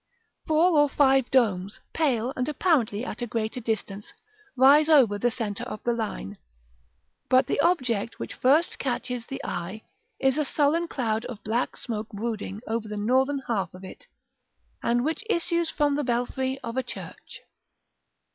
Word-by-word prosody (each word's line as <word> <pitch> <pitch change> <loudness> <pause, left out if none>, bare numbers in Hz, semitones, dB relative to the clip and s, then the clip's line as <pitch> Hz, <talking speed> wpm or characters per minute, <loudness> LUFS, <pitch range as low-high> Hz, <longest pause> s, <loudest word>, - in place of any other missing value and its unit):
Four 315 +1 +4
or 290 0 +4
five 270 -3 +3
domes, 205 -6 +1
pale, 260 -5 +1
and 255 +3 -1
apparently 260 - +1
at - - -6
a 240 - -2
greater 220 +1 -2
distance, 210 -3 -4 0.5
rise 285 +4 +6
over 245 -10 +5
the 240 - +2
centre 225 -2 -4
of 250 - -7
the 240 - +1
line; 210 - -4 0.9
but 255 0 +5
the - - -1
object 255 - +1
which - - -6
first 295 +7 +2
catches 250 -2 -3
the 270 - -5
eye 185 +5 -5 0.4
is 270 +2 +2
a - - +3
sullen 300 +4 +1
cloud 225 -7 -2
of 225 -4 -8
black 230 +4 -1
smoke 220 -2 -5
brooding 210 -1 -4
over 225 0 -2
the 210 0 -5
northern 265 +6 +1
half 210 -5 -1
of 185 - -12
it, 190 - -11 0.7
and 240 +2 +1
which 320 +8 -2
issues 340 -3 +1
from 295 -2 +1
the 295 - -1
belfry 260 +2 -1
of 230 +2 -5
a - - +3
church. - - -9
245 Hz, 160 wpm, -26 LUFS, 220-285 Hz, 0.9 s, rise